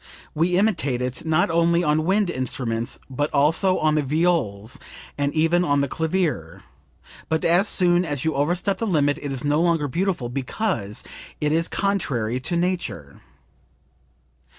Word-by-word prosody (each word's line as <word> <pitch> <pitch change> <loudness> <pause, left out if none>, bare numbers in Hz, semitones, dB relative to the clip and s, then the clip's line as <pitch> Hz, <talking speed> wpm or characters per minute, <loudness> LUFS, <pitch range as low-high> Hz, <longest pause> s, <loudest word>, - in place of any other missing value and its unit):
We 175 +3 +1
imitate 175 - +1
it 125 +5 -4
not 160 +1 +2
only 170 +1 +3
on 155 0 +1
wind 195 0 +2
instruments 120 -3 -3
but 145 +3 -2
also 160 +6 +3
on 155 0 +2
the 150 - +2
viols 135 - 0 0.4
and 145 0 0
even 165 +3 +3
on 145 -4 +2
the 140 - 0
clavier. 155 - -2 0.7
But 160 0 0
as 175 +5 +4
soon 175 -2 +3
as 145 -5 -3
you 160 - +1
overstep 175 +7 0
the 230 - -1
limit 145 -4 +1
it 145 - -4
is 135 -2 -3
no 145 +2 +2
longer 165 -4 +2
beautiful 175 -3 -1
because 125 - -3 0.4
it 150 0 0
is 165 +1 +2
contrary 135 - -1
to 170 +7 -2
nature." 170 - -3
155 Hz, 150 wpm, -23 LUFS, 135-175 Hz, 0.7 s, as